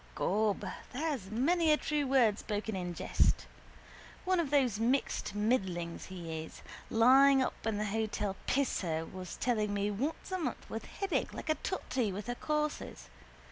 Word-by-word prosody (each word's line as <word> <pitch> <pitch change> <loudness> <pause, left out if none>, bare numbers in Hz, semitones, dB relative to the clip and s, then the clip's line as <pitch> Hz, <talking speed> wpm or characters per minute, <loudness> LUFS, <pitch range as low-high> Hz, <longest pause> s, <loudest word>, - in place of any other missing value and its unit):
Gob, 210 +1 +1 0.3
there's 275 - -2
many 315 - +3
a 300 - +5
true 295 -2 -1
word 240 -6 +4
spoken 210 0 -3
in 180 -2 -3
jest. - - +1 0.8
One 370 -1 +2
of 325 -5 0
those 260 -7 +2
mixed 235 -3 0
middlings 190 -6 0
he 165 -4 -5
is. - - -12 0.3
Lying 265 +4 +6
up 240 - -4
in 220 -2 0
the 210 - -1
hotel 210 -2 -1
Pisser 175 - 0
was 185 0 -7
telling 215 -4 0
me 205 +1 0
once 280 - -3
a 370 - -1
month 330 - -3
with - - -4
headache 395 -2 -2
like - - -6
a 310 - +4
totty 250 - -1
with 195 +2 -5
her 245 - -2
courses. 300 +3 -3
225 Hz, 160 wpm, -32 LUFS, 200-280 Hz, 0.8 s, Lying